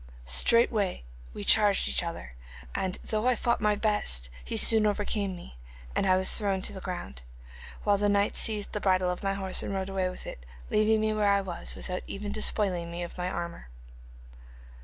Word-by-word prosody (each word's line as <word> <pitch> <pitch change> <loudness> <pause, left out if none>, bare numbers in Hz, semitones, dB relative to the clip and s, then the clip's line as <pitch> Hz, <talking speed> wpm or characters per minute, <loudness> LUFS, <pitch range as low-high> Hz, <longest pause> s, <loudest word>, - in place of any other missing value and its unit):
Straightway 205 - +2 0.3
we 100 - -7
charged 205 - +4
each - - +2
other, 165 - -6 0.4
and 185 -1 -2
though 215 +2 -1
I 255 - +4
fought 235 0 0
my 210 0 +3
best, 205 - +1
he - - -3
soon 220 -2 +5
overcame 205 -2 -1
me, 175 - -12 0.4
and 195 - +1
I 185 0 +4
was 190 0 +3
thrown 195 -3 0
to - - -1
the 190 - -7
ground, 175 - -6 0.6
while 205 -1 +3
the 205 0 +2
knight 200 0 +2
seized 210 -3 0
the 210 - -3
bridle 185 -2 +2
of 180 - -5
my 195 0 -1
horse, 190 -1 +1
and 200 - -4
rode 190 0 -3
away 190 -1 -1
with 180 - -9
it, - - -8 0.3
leaving 215 +1 +3
me 215 0 +1
where 210 -1 +2
I 200 0 +3
was, 180 -3 -5
without 180 -1 -4
even 205 +1 -5
despoiling 195 -5 +1
me 170 +1 -5
of 175 - -8
my 180 0 -2
armour. 170 - -5
195 Hz, 195 wpm, -28 LUFS, 180-210 Hz, 0.6 s, soon